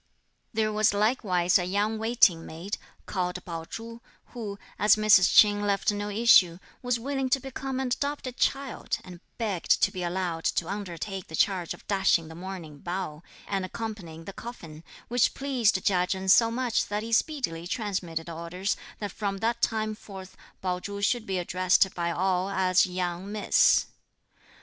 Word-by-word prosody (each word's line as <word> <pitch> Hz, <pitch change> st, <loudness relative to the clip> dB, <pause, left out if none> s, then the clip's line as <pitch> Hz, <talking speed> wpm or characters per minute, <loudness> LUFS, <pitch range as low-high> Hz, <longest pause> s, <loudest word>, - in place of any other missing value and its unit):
There 215 Hz, -1 st, 0 dB
was 215 Hz, -1 st, +3 dB
likewise 200 Hz, -5 st, +2 dB
a 180 Hz, -, -1 dB
young 205 Hz, +4 st, 0 dB
waiting 220 Hz, -7 st, +3 dB
maid, 170 Hz, +7 st, -6 dB, 0.3 s
called 180 Hz, -2 st, -3 dB
Pao 165 Hz, -2 st, -5 dB
Chu, 230 Hz, +4 st, -8 dB, 0.3 s
who, 215 Hz, -5 st, -5 dB, 0.2 s
as 210 Hz, -, +6 dB
Mrs. 215 Hz, -3 st, +5 dB
Ch'in 205 Hz, -1 st, +7 dB
left 200 Hz, 0 st, +1 dB
no 205 Hz, 0 st, -3 dB
issue, 200 Hz, -5 st, +5 dB, 0.2 s
was 245 Hz, -1 st, 0 dB
willing 270 Hz, +1 st, -2 dB
to 270 Hz, -, +3 dB
become 265 Hz, 0 st, -5 dB
an 265 Hz, -1 st, -1 dB
adopted 280 Hz, 0 st, -2 dB
child, 275 Hz, -2 st, -1 dB
and 180 Hz, -2 st, -11 dB, 0.2 s
begged 205 Hz, -7 st, +1 dB
to -, -, +4 dB
be 185 Hz, -, -5 dB
allowed 175 Hz, -2 st, -2 dB
to 165 Hz, -, 0 dB
undertake 190 Hz, -1 st, -5 dB
the 160 Hz, -, -6 dB
charge 180 Hz, -1 st, +1 dB
of -, -, -20 dB
dashing 190 Hz, -5 st, +2 dB
the -, -, -9 dB
mourning 170 Hz, -4 st, -8 dB
bowl, 175 Hz, -2 st, -5 dB, 0.2 s
and 195 Hz, -2 st, -1 dB
accompanying 185 Hz, -6 st, -6 dB
the 195 Hz, -, -7 dB
coffin; 165 Hz, -10 st, -9 dB, 0.2 s
which 245 Hz, 0 st, +2 dB
pleased 260 Hz, -7 st, +1 dB
Chia 180 Hz, -2 st, +3 dB
Chen 190 Hz, 0 st, -3 dB
so 230 Hz, +4 st, +6 dB
much 240 Hz, 0 st, 0 dB
that 210 Hz, +1 st, -2 dB
he 230 Hz, 0 st, -4 dB
speedily 225 Hz, -, 0 dB
transmitted 185 Hz, -6 st, -3 dB
orders 170 Hz, +4 st, -3 dB, 0.2 s
that 205 Hz, -1 st, -5 dB
from 200 Hz, -2 st, -3 dB
that 235 Hz, +3 st, -1 dB
time 215 Hz, -1 st, 0 dB
forth 190 Hz, -3 st, -11 dB, 0.3 s
Pao 180 Hz, -1 st, -1 dB
Chu 200 Hz, +2 st, -6 dB
should 230 Hz, +2 st, +1 dB
be 190 Hz, -1 st, -1 dB
addressed 185 Hz, +1 st, +2 dB
by 170 Hz, -1 st, -1 dB
all 185 Hz, +2 st, 0 dB
as 185 Hz, -1 st, +3 dB
'young 180 Hz, +1 st, -3 dB
miss.' 210 Hz, -1 st, +4 dB
195 Hz, 165 wpm, -27 LUFS, 180-225 Hz, 0.3 s, Ch'in